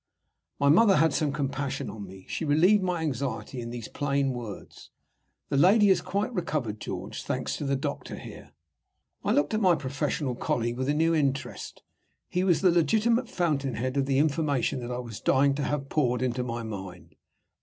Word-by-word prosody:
My 140 Hz, -, +2 dB
mother 195 Hz, +6 st, +6 dB
had 160 Hz, -1 st, +3 dB
some 150 Hz, -2 st, +1 dB
compassion 140 Hz, -1 st, -3 dB
on 100 Hz, -1 st, -7 dB
me. 95 Hz, 0 st, -12 dB
She -, -, -3 dB
relieved 170 Hz, +8 st, +4 dB
my 180 Hz, -3 st, -1 dB
anxiety 125 Hz, -4 st, -3 dB
in 115 Hz, -, -6 dB
these 120 Hz, -2 st, -6 dB
plain 140 Hz, -1 st, 0 dB
words: 115 Hz, -5 st, -8 dB, 0.6 s
"The 140 Hz, -, 0 dB
lady 200 Hz, +7 st, +6 dB
has 190 Hz, -, +4 dB
quite 205 Hz, +5 st, -2 dB
recovered, 150 Hz, -, -2 dB
George, 95 Hz, +4 st, -5 dB
thanks 130 Hz, -, -2 dB
to 145 Hz, -, -4 dB
the 140 Hz, 0 st, +1 dB
doctor 135 Hz, -, -4 dB
here." -, -, -11 dB, 0.7 s
I -, -, +1 dB
looked 145 Hz, -, +2 dB
at 215 Hz, -, +1 dB
my 185 Hz, -4 st, +5 dB
professional 140 Hz, -1 st, -2 dB
colleague 120 Hz, 0 st, -1 dB
with 130 Hz, +2 st, -1 dB
a 145 Hz, -, +2 dB
new 165 Hz, +2 st, +3 dB
interest. 140 Hz, -3 st, -2 dB, 0.5 s
He 180 Hz, -, 0 dB
was 180 Hz, -4 st, +3 dB
the 185 Hz, -2 st, +5 dB
legitimate 225 Hz, +8 st, +2 dB
fountainhead 135 Hz, -7 st, -1 dB
of 135 Hz, -1 st, +1 dB
the 135 Hz, -1 st, +2 dB
information 145 Hz, -3 st, +1 dB
that 120 Hz, -1 st, -6 dB
I 125 Hz, -, -2 dB
was 120 Hz, -4 st, -7 dB
dying 140 Hz, +1 st, +3 dB
to 145 Hz, +1 st, -2 dB
have 145 Hz, -2 st, -2 dB
poured 125 Hz, -4 st, +1 dB
into 125 Hz, 0 st, -1 dB
my 120 Hz, -1 st, -4 dB
mind. 95 Hz, -4 st, -8 dB
140 Hz, 185 wpm, -27 LUFS, 125-160 Hz, 0.7 s, mother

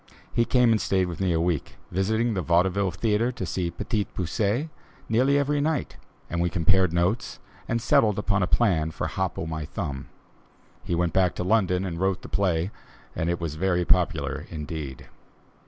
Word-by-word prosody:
He 115 Hz, -, +3 dB
came 125 Hz, -2 st, +4 dB
and 110 Hz, -, +2 dB
stayed 95 Hz, -1 st, +1 dB
with 90 Hz, +1 st, -5 dB
me 95 Hz, -2 st, +2 dB
a 80 Hz, -, +2 dB
week, 85 Hz, -2 st, -1 dB, 0.2 s
visiting 110 Hz, +5 st, +1 dB
the 95 Hz, -, -1 dB
Vaudeville 90 Hz, +3 st, +2 dB
Theatre 110 Hz, +6 st, +1 dB
to 95 Hz, -, -4 dB
see 90 Hz, 0 st, -2 dB
"Petit 105 Hz, +4 st, -2 dB
Poucet" 105 Hz, -, -1 dB, 0.4 s
nearly 130 Hz, +5 st, +3 dB
every 145 Hz, +1 st, +1 dB
night, 155 Hz, -2 st, -1 dB, 0.3 s
and 85 Hz, +1 st, -2 dB
we 85 Hz, -, +2 dB
compared 95 Hz, +1 st, +3 dB
notes 90 Hz, +7 st, 0 dB, 0.3 s
and 115 Hz, -, 0 dB
settled 110 Hz, -2 st, +3 dB
upon 100 Hz, -1 st, +1 dB
a 90 Hz, -, +2 dB
plan 85 Hz, -10 st, +2 dB
for 80 Hz, -, -4 dB
"Hop 95 Hz, -6 st, -2 dB
o' -, -, -3 dB
my 80 Hz, -1 st, -4 dB
Thumb." 70 Hz, -2 st, -5 dB, 0.8 s
He 85 Hz, -, -1 dB
went 85 Hz, 0 st, 0 dB
back 95 Hz, -2 st, +3 dB
to -, -, -2 dB
London 95 Hz, -2 st, +2 dB
and 85 Hz, -3 st, -4 dB
wrote 95 Hz, 0 st, 0 dB
the -, -, -9 dB
play 90 Hz, -1 st, 0 dB, 0.4 s
and 80 Hz, -, -1 dB
it 85 Hz, -, -1 dB
was 85 Hz, -4 st, -3 dB
very 90 Hz, +2 st, +1 dB
popular 90 Hz, -3 st, +1 dB
indeed. 75 Hz, -4 st, -6 dB
95 Hz, 185 wpm, -26 LUFS, 85-105 Hz, 0.8 s, came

